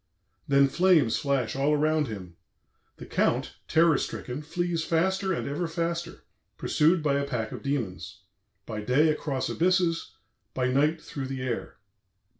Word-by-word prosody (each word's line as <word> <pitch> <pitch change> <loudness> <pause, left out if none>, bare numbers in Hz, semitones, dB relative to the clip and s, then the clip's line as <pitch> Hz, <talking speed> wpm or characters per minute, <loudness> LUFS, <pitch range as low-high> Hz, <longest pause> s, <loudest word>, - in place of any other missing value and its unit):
"Then 140 0 +5
flames 160 -6 +3
flash 135 -5 0
all 140 +2 +2
around 155 0 +2
him.... 95 -6 -8 0.6
The - - -9
Count, - - 0
terror 160 -2 +4
stricken, 125 +4 -4
flees 170 +1 -2
faster 190 +4 +1
and 175 - -2
ever 150 +5 -2
faster, 170 0 -3 0.3
pursued 160 +2 +2
by 140 -2 +2
a - - -1
pack 115 -5 -3
of - - -7
demons,... 95 - -4 0.4
by 110 -2 -5
day 135 +8 +3
across 145 -3 -1
abysses, 175 -1 +1 0.4
by 125 -1 +1
night 150 +5 +2
through 140 -4 -6
the 130 -1 -4
air." 125 -2 -4
145 Hz, 145 wpm, -27 LUFS, 130-165 Hz, 0.6 s, Then